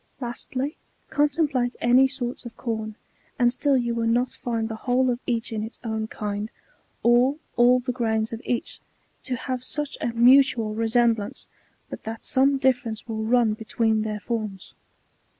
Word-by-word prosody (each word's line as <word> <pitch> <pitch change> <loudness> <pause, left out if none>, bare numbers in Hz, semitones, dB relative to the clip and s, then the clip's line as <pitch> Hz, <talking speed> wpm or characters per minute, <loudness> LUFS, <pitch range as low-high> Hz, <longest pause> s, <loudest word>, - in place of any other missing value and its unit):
^ - - -41 0.2
Lastly, 255 +3 -4 0.3
contemplate 290 -4 +1
any 250 +3 +5
sorts 260 -2 -4
of 240 -2 -10
com,^ 220 -2 -4 0.4
and 240 -1 +3
still 280 +1 +2
you 240 -1 0
will 230 0 -1
not 245 +2 +1
find 230 -2 -2
the 220 - -5
whole 255 +1 +3
of 240 - -2
each 235 -1 -1
in 215 - -2
its 220 +2 -7
own 220 -1 -2
kind, 210 0 -4 0.5
or 245 +4 +4 0.2
all 245 +1 +5
the 250 +1 -3
grains 225 -2 -1
of 225 - -5
each, 240 - -3 0.4
to 260 - -2
have 255 0 -4
such 295 +2 -3
a - - 0
mutual 235 -1 +4
resemblance, 225 -1 +1 0.4
but - - -8
that 225 +1 -6
some 275 +1 +3
difference 250 -5 0
will 220 -1 -3
run 230 -1 +3
between 220 0 0
their 215 -1 -3
fbrms. 215 -5 -4
240 Hz, 165 wpm, -25 LUFS, 220-255 Hz, 0.5 s, any